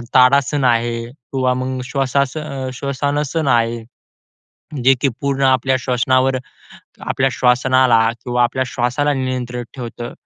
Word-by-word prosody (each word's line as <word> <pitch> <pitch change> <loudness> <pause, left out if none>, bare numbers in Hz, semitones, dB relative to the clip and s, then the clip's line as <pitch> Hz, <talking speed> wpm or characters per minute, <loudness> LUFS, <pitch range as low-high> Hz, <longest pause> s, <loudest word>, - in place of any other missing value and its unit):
ताडासन 140 +2 +4
आहे 115 -1 +1
किंवा 130 0 -2
मग 130 0 -3
श्वासान 140 0 -2
श्वासासन 145 +3 -2
आहे. 115 -1 +1 1.0
जे 135 +1 +6
की 140 - +2
पूर्ण 140 -1 -1
आपल्या 130 0 +3
श्वसनावर 130 +1 +1 0.7
आपल्या 135 0 +1
श्वासनाला 125 -1 +3 0.3
किंवा 125 0 +1
आपल्या 130 +2 +1
श्वासाला 130 +4 0
नियंत्रित 125 -2 -3
ठेवतं. 120 -1 -6
130 Hz, 110 wpm, -18 LUFS, 125-135 Hz, 1.0 s, जे